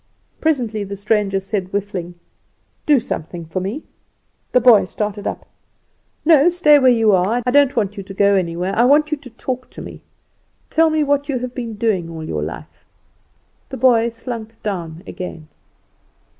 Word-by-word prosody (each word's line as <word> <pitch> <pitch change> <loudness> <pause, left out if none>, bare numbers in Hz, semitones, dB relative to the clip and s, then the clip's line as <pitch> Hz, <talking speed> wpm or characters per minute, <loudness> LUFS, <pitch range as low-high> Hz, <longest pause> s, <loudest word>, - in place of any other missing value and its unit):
Presently 240 -9 0
the 200 0 -6
stranger 200 -1 0
said, 195 -1 -3
whiffing, 190 -3 -4 0.7
"Do 295 -3 +5
something 170 -5 -5
for 160 +4 -4
me." 205 +12 -4 0.7
The 250 - +5
boy 235 -5 +6
started 205 +2 -4
up. - - -5 0.8
"No; 315 0 +6
stay 300 -4 +5
where 260 -2 +5
you 225 -3 +3
are. 200 +6 +2
I 250 - +1
don't 280 0 +4
want 205 -3 -1
you - - -4
to 195 0 -10
go 200 +1 +4
anyowhere; 180 0 -1
I 235 - +4
want 295 +4 +4
you 305 - 0
to 275 -2 -13
talk 255 +2 -5
to - - -12
me. - - -10 0.7
Tell 325 0 +4
me 310 -1 +1
what 285 0 0
you 270 - 0
have 250 0 -5
been 235 -4 -5
doing 205 -6 -1
all 160 -1 -7
your 75 - -3
life." 75 +2 -8 0.9
The - - -6
boy 235 -2 +4
slunk 230 -1 -7
down 170 -5 -4
again. 165 -4 -8
220 Hz, 170 wpm, -19 LUFS, 190-255 Hz, 0.9 s, boy